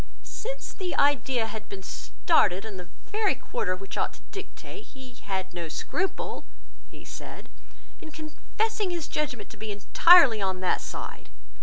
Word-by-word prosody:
"Since - - -5
the 370 -3 -3
idea 265 -4 +3
had 220 -1 -6
been 195 -1 -7
started 200 - +2
in 210 -3 -6
the 180 -2 -8 0.2
very 425 -1 +2
quarter 185 -1 -2
which 195 +1 -6
ought - - 0
to - - -18
dictate, 410 +1 -8
he 260 -2 -12
had 190 -6 -4
no 170 -2 -4
scruple," 375 - -2 0.5
he - - -13
said, - - -9 0.5
"in 315 - -8
confessing 370 +7 -2
his 340 -3 -2
judgement 290 -6 -2
to - - -11
be 215 0 -4
entirely 230 - +7
on 190 -1 0
that 185 - +2
side. - - -6
255 Hz, 155 wpm, -28 LUFS, -, 0.5 s, entirely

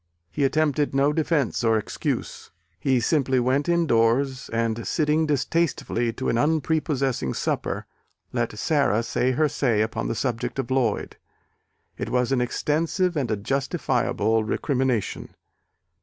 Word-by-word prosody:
He 145 - -1
attempted 150 0 +1
no 140 +2 +3
defence 150 -6 0
or 115 -1 +3
excuse. 105 - -4 0.3
He 130 -2 +2
simply 130 +1 +2
went 130 +5 +1
indoors, 135 -5 +2
and 115 0 -1
sitting 155 0 +1
distastefully 145 -5 0
to 130 - -4
an 115 - +1
unprepossessing 145 - 0
supper, - - -2 0.5
let 120 -3 -2
Sara 140 -5 +2
say 125 +2 0
her 155 +4 +2
say 120 -7 +1
upon 110 +1 -3
the - - -2
subject 120 0 -2
of 130 -2 -3
Lloyd: 125 -5 0 0.8
it - - -3
was 125 0 +1
an 130 -2 +2
extensive 165 +8 0
and 135 -6 -1
a 110 - 0
justifiable 125 - 0
recrimination. 130 0 -1
130 Hz, 130 wpm, -24 LUFS, 115-150 Hz, 0.8 s, no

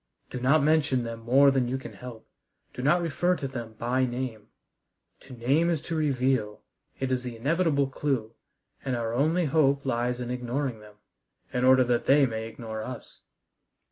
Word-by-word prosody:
"Do 125 - -4
not 140 +4 +3
mention 150 -4 +2
them 115 -1 -6
more 135 +5 +5
than 130 -2 +1
you 130 +2 -1
can 130 - -9
help. 125 -3 -10 0.5
Do - - -6
not 170 +6 +3
refer 175 +3 +1
to 140 - -4
them 120 -4 -7
by 120 +4 0
name. 120 -4 -4 0.7
To 135 - -13
name 135 +8 +1
is 165 -3 +1
to 165 +1 -5
reveal: 130 -8 0 0.4
it 130 -1 -2
is 130 -1 0
the 120 -2 -6
inevitable 145 +2 +1
clue, 130 -4 -2 0.5
and 130 -2 -1
our 115 -1 -2
only 160 +7 +2
hope 140 -2 +2
lies 125 -1 -1
in 125 0 -4
ignoring 125 0 -3
them, 105 -1 -15 0.6
in 125 - 0
order 130 0 +6
that 120 -1 0
they 140 +1 +6
may 110 -2 -4
ignore 110 -1 -7
us." 125 +2 -9
130 Hz, 175 wpm, -27 LUFS, 120-140 Hz, 0.7 s, order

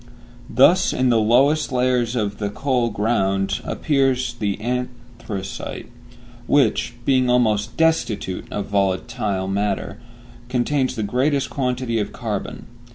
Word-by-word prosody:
Thus 175 +8 +4
in 130 0 +1
the 115 -2 +4
lowest 135 +8 +3
layers 125 -1 +1
of 105 -3 -2
the 100 -1 -1
coal 125 +1 0
ground 100 -3 0
appears 135 -4 0
the 100 -2 -2
anthracite, 120 -4 -5 0.6
which, 140 -4 +2
being 130 -2 +3
almost 115 -3 +1
destitute 120 - 0
of 105 -1 -3
volatile 100 0 -1
matter, 100 +1 -2 0.5
contains 130 +1 0
the 110 - -2
greatest 135 +6 0
quantity 125 -3 -1
of 105 - -2
carbon. 110 -5 -5
120 Hz, 115 wpm, -21 LUFS, 105-130 Hz, 0.6 s, Thus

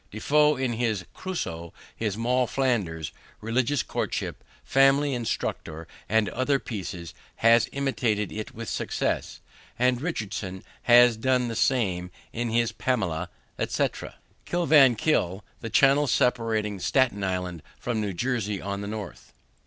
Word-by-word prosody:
De 105 - -9
Foe 150 +6 +4
in 130 -2 -1
his 110 -5 -1
Cruso, 85 - -5 0.2
his 105 -3 -2
Moll 125 +2 +1
Flanders, 100 - -1 0.3
Religious 125 +4 0
Courtship, - - -3 0.2
Family 135 +1 +4
Instructor, 85 -8 -3 0.2
and 110 -1 +3
other 130 +3 +1
pieces, 95 - -6 0.2
has 115 +1 +4
imitated 120 -7 -1
it 110 0 -5
with 115 0 -6
success; - - -2 0.4
and 125 0 +2
Richardson 105 - -4 0.3
has 120 -1 +7
done 125 +1 +1
the 115 - -4
same 95 -9 +1 0.2
in 120 0 -2
his 115 0 +1
Pamela, 95 -11 -1 0.3
etc. - - -2 0.3
Kill 175 0 -1
van 135 -6 +7
Kull, 105 - 0
the 115 - -5
channel 140 +4 +4
separating 110 -5 +1
Staten 115 -2 +1
Island 90 -3 -2 0.2
from 115 -3 -2
New 105 -2 -2
Jersey 105 -1 -1
on 100 +1 -4
the 100 - -5
north. 105 -4 -7
115 Hz, 135 wpm, -26 LUFS, 100-130 Hz, 0.4 s, has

